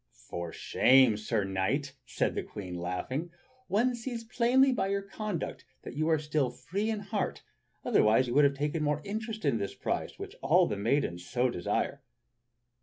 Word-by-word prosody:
"For 85 -1 -4
shame, 130 +2 +4
Sir 105 0 -1
Knight!" 95 +10 -1
said - - 0
the - - -1
Queen, 95 -3 -8
still 90 - -5
laughing. 130 - -3 0.4
"One 230 +7 +2
sees 235 -1 -5
plainly 245 +3 +3
by 245 - 0
your 200 0 -1
conduct 200 -2 -4 0.2
that - - -7
you 155 +2 0
are 160 - +4
still 150 -3 0
free 185 - -3
in 215 -2 -1
heart, 205 0 -3 0.4
otherwise 110 +4 +4
you 120 - -2
would 145 +2 +6
have 140 0 +2
taken 150 +3 -1
more 150 0 0
interest 215 -1 -4
in 120 -6 +2
this 100 - -4
prize - - -3
which - - -8
all 170 +7 +5
the 105 - -2
maidens 100 -5 0
so 125 +6 +1
desire." 105 +8 -1
145 Hz, 180 wpm, -30 LUFS, -, 0.4 s, would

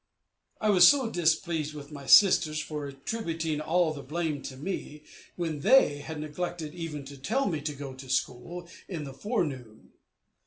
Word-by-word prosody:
I 215 -1 +2
was 185 -3 +9 0.2
displeased 160 -3 0
with 145 0 -9
my 140 -2 -9
sisters 170 -6 +6
for 150 -2 -4
attributing 160 +1 -3
all 165 +1 +2
the 145 - -7
blame 150 0 -3
to 130 -1 -8
me, 150 -2 -5 0.3
when 165 -4 -3
they 200 - +5
had 150 +2 -7
neglected 155 +1 -4
even 160 -5 -6
to 140 +1 -10
tell 255 - 0
me 160 -6 -1
to 150 0 -4
go 140 -1 -7
to 130 0 -11
school 140 +7 -2 0.2
in 170 -6 -5
the 135 -2 -7
forenoon. 135 - -4
155 Hz, 160 wpm, -28 LUFS, 140-175 Hz, 0.3 s, was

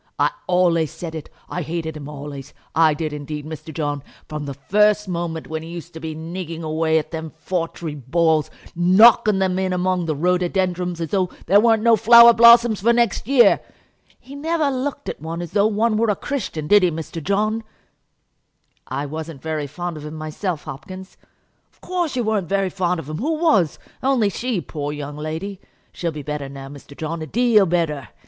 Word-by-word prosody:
I - - +2 0.2
ollays 175 -3 +3
said 165 -2 -7
it. 160 -2 -7 0.2
I 180 - -4
hated 160 0 -4
him 145 -2 -8
ollays; 145 -1 -8 0.2
I 160 -2 +4
did 155 0 -3
indeed, 150 0 -6
Mr. 160 0 -8
John, 145 -2 -3 0.3
from 150 -1 -5
the 140 - -5
first 210 +9 +2
moment 170 -2 -3
when 160 0 -5
he 165 - -9
used 170 0 -8
to 160 - -8
be 160 -1 -5
nigging 165 0 -6
away 160 0 +1
at 155 - -2
them 160 -1 -5
foutry 165 -2 -4
balls, 155 +3 +1 0.3
knocking 200 +4 +6
them 190 -1 0
in 190 -1 0
among 180 -1 0
the 155 - 0
rhododendrons, 180 +1 0
as 165 - -3
though 185 -3 +1 0.2
there 200 +4 +5
weren't 225 -1 +3
no 230 -1 +6
flower 235 +1 +8
blossoms 235 -2 +6
for 230 +4 +4
next 235 -3 +1
year. 265 -2 +5 0.6
He 265 - -13
never 305 0 0
looked 275 +2 -4
at - - -5
one 165 +2 -5
as 175 -2 -6
though 205 +1 +3
one 215 +1 +1
were 225 0 +2
a 205 - +2
Christian; 225 - -4
did 205 +6 +5
he, 180 - +3
Mr. 160 0 -6
John?" 215 +4 0 1.2
"I 135 +3 -3
wasn't 155 -1 -7
very 155 -2 -3
fond 175 +3 -5
of 150 - -9
him 150 - -8
myself, 155 +2 -4
Hopkins." 185 +7 -9 0.6
"Of - - -33
course 350 -6 -2
you 245 - 0
weren't 210 -6 -1
very 195 -1 0
fond 180 -2 -1
of 145 - -8
him. 155 +1 -5
Who 310 +7 0
was? 220 - +2 0.2
only 255 -6 +2
she, 230 -1 -2
poor 145 -3 -5
young 145 0 -6
lady. 160 +6 -5 0.3
She'll 170 -2 -3
be 150 -2 -7
better 145 -1 -4
now, 135 0 -9
Mr. 140 0 -13
John, 160 +1 -4
a 155 - -5
deal 230 -3 +3
better. 160 -5 -1
170 Hz, 195 wpm, -21 LUFS, 155-210 Hz, 1.2 s, flower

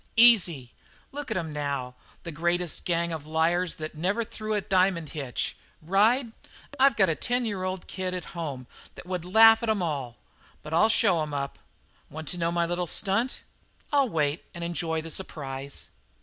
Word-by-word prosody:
"Easy. 180 - +5 0.4
Look 285 -1 -6
at - - -1
'em 160 -4 -3
now 140 -4 -3 0.3
the 170 - -6
greatest 175 +2 -1
gang 170 -1 0
of 155 -2 -6
liars 165 +3 +1
that 155 0 -6
never 190 +9 0
threw 215 -1 -4
a - - +2
diamond 185 -4 +1
hitch! 140 -6 -3 0.2
Ride? 220 - +2 0.5
I've 270 -2 +5
got 195 -4 +4
a - - +2
ten 245 +8 -1
year 185 -3 -2
kid 185 -1 -4
home 145 -7 -5 0.3
that - - -11
would 180 -2 -3
laugh 225 +4 +7
at 230 - -2
'em 210 -4 +1
all. 135 -7 -3 0.5
But 150 - -7
I'll 195 +7 +5
show 190 -7 +3
'em 150 -1 -3
up. 140 0 -4 0.5
Want 160 +1 -8
to 180 - 0
know 165 0 +1
my 170 0 +1
little 175 +1 -2
stunt?" 215 +9 0 0.5
"I'll 280 -3 +4
wait 150 -3 0
and 170 - -5
enjoy 165 -1 -2
the 165 - -7
surprise." 140 -6 -4
175 Hz, 175 wpm, -27 LUFS, 155-200 Hz, 0.5 s, laugh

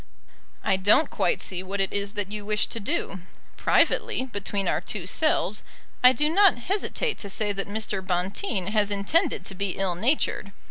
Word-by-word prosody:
I 190 - +2
don't 205 +11 +3
quite 475 - 0
see 185 -1 -3
what 195 +2 -5
it 195 -1 0
is 200 0 -1
that 205 -1 -3
you 210 -1 -5
wish 210 +1 +1
to 230 - -4
do. 200 -2 -2 0.4
Privately, 260 - +2
between 200 -4 -3
our - - +1
two 200 -5 -4
selves, 215 - +1 0.4
I 250 - +9
do 300 +3 +1
not 380 0 +5
hesitate 405 - -2
to 200 - -6
say 210 +1 0
that 195 -1 -3
Mr. 210 -2 -3
Bonteen 185 - -2
has 210 -2 +2
intended 205 - +1
to - - -5
be 195 -1 -3
ill 195 -2 0
natured. 205 - 0
205 Hz, 180 wpm, -25 LUFS, 195-240 Hz, 0.4 s, I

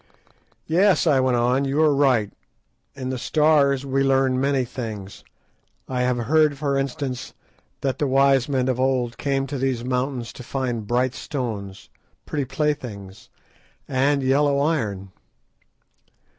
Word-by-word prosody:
"Yes," 185 +5 +3
I 145 -5 +4
went 130 -1 +2
on, 125 +3 +2
"you 140 +2 -1
are 150 -2 +4
right, 130 -7 +2 0.6
in 130 -2 -4
the 130 - -3
Stars 140 -2 +2
we 135 0 0
learn 135 -1 +2
many 135 -2 +1
things. 110 -6 -7 0.6
I 125 -1 -2
have 125 0 +1
heard, 150 +4 +2
for 140 -1 -1
instance, 135 -1 -3 0.5
that 135 -2 -2
the 145 - +1
wise 135 0 +3
men 130 -2 0
of 130 -1 0
old 130 -2 0
came 135 -1 0
to 135 0 -5
these 130 -2 -1
mountains 125 -1 -2
to 125 - -10
find 120 -4 -3
bright 125 +2 +1
stones, 110 - -5 0.3
pretty 145 -3 -2
playthings, 120 -9 -4 0.6
and 140 +1 +1
yellow 140 +2 +2
iron." 105 - -1
130 Hz, 140 wpm, -23 LUFS, 125-140 Hz, 0.6 s, I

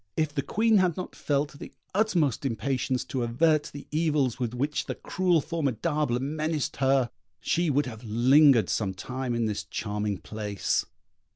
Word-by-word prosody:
If 155 -2 0
the 140 - 0
Queen 220 +8 +2
had 180 -4 +2
not 185 - -6
felt 145 0 -1
the - - -8 0.2
utmost 180 - +1
impatience 130 +1 -1
to 130 - -3
avert 150 +6 +2
the 145 - -9
evils 150 -6 +1
with 120 -1 -2
which 145 +4 -1
the - - -3
cruel 180 -4 +1
Formidable 150 -3 -1
menaced 155 +2 -2
her, 135 -2 +2 0.3
she 170 -1 +1
would 145 +1 +2
have 115 -3 -8
lingered 120 - +5
some 95 -3 -1
time 125 +4 -3
in 115 -1 0
this 105 -2 -2
charming 105 -1 -3
place. 105 -1 -2
135 Hz, 160 wpm, -27 LUFS, 120-155 Hz, 0.3 s, lingered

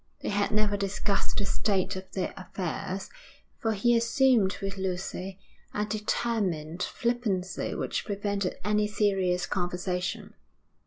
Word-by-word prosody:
They - - -2
had 205 0 +2
never 210 -1 +3
discussed 200 0 0
the 200 - +2
state 195 -1 +1
of 190 0 -7
their 185 - -1
affairs, 185 +1 -4 0.5
for 225 -1 +1
he 235 +4 +4
assumed 230 -3 +4
with 195 0 -3
Lucy 190 0 -3 0.4
a 210 - +1
determined 205 -6 0
flippancy 220 -7 0
which - - -1
prevented 200 -2 -1
any 210 0 +3
serious 195 -4 +2
conversation. 180 0 -2
200 Hz, 120 wpm, -29 LUFS, 185-210 Hz, 0.5 s, he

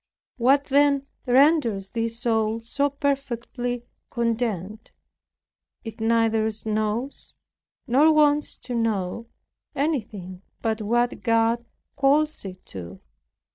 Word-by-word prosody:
What, 270 +4 +4
then, 280 0 +3 0.2
renders 250 -7 +3
this 230 0 -2
soul 225 -1 +1
so 280 +5 -1
perfectly 245 -3 -3 0.2
content? 225 -3 -2 0.9
It 225 -1 -8
neither 225 -1 +2 0.2
knows, 215 +5 -2 0.5
nor 285 +5 +5
wants 300 -1 +3
to 250 - -7
know, 225 -1 -1 0.5
anything 210 - -3 0.2
but 220 -1 0
what 240 +3 0
God 230 0 +2 0.3
calls 300 +3 +2
it 185 -1 -9
to. 95 0 -8
230 Hz, 95 wpm, -24 LUFS, 220-275 Hz, 0.9 s, nor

